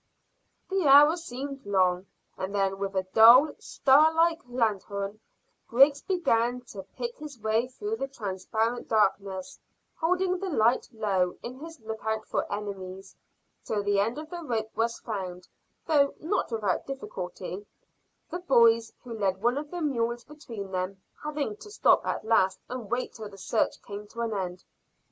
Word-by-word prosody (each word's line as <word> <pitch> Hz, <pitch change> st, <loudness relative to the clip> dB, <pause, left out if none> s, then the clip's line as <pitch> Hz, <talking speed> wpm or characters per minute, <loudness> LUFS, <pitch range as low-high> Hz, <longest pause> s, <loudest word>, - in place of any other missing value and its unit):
The 380 Hz, -5 st, +1 dB
hour 290 Hz, +4 st, +8 dB
seemed 275 Hz, -4 st, -6 dB
long, 185 Hz, -2 st, +1 dB, 0.3 s
and 190 Hz, +2 st, -4 dB
then 195 Hz, -1 st, 0 dB
with 195 Hz, 0 st, -3 dB
a 190 Hz, -, +1 dB
dull 245 Hz, +7 st, +8 dB
star 290 Hz, +4 st, +4 dB
like 330 Hz, +1 st, +2 dB
lanthorn 205 Hz, -3 st, -1 dB, 0.5 s
Griggs 275 Hz, +4 st, +5 dB
began 250 Hz, -9 st, +1 dB
to 200 Hz, -, -7 dB, 0.2 s
pick 475 Hz, 0 st, -4 dB
his 295 Hz, -5 st, -9 dB
way 220 Hz, +3 st, +1 dB
through 415 Hz, -, -4 dB
the 270 Hz, -, -2 dB
transparent 220 Hz, 0 st, -2 dB
darkness, 195 Hz, -3 st, 0 dB, 0.4 s
holding 365 Hz, +2 st, +1 dB
the 390 Hz, 0 st, -3 dB
light 240 Hz, -5 st, +2 dB
low 195 Hz, -6 st, 0 dB
in 250 Hz, +2 st, -7 dB
his 325 Hz, 0 st, -10 dB
lookout 220 Hz, 0 st, -3 dB
for -, -, -2 dB
enemies, 195 Hz, -2 st, -6 dB, 0.5 s
till 210 Hz, -2 st, -2 dB
the 205 Hz, 0 st, +2 dB
end 225 Hz, +6 st, 0 dB
of 310 Hz, +1 st, -8 dB
the 350 Hz, -1 st, -5 dB
rope 220 Hz, -6 st, -2 dB
was 230 Hz, +1 st, 0 dB
found, 185 Hz, -5 st, -6 dB, 0.4 s
though 285 Hz, -3 st, +3 dB
not 325 Hz, -4 st, -1 dB
without 210 Hz, -5 st, -1 dB
difficulty, 195 Hz, -7 st, -6 dB, 0.7 s
the 350 Hz, -, -3 dB
boys, 230 Hz, -8 st, +4 dB
who 245 Hz, -2 st, -7 dB
led 195 Hz, -4 st, 0 dB
one 245 Hz, +4 st, +2 dB
of 295 Hz, 0 st, -7 dB
the 350 Hz, 0 st, -4 dB
mules 235 Hz, -4 st, -1 dB
between 230 Hz, -, -9 dB
them, 185 Hz, +1 st, -3 dB, 0.2 s
having 295 Hz, -7 st, -2 dB
to 420 Hz, -, -12 dB
stop 415 Hz, -, +3 dB
at -, -, -2 dB
last 205 Hz, -4 st, +3 dB
and 245 Hz, -4 st, -6 dB
wait 250 Hz, +1 st, -2 dB
till 215 Hz, -2 st, -8 dB
the 195 Hz, -, -13 dB
search 205 Hz, +4 st, 0 dB
came 205 Hz, 0 st, -8 dB
to 235 Hz, +3 st, -7 dB
an 230 Hz, -1 st, -1 dB
end. 185 Hz, -2 st, -4 dB
230 Hz, 160 wpm, -28 LUFS, 200-280 Hz, 0.7 s, hour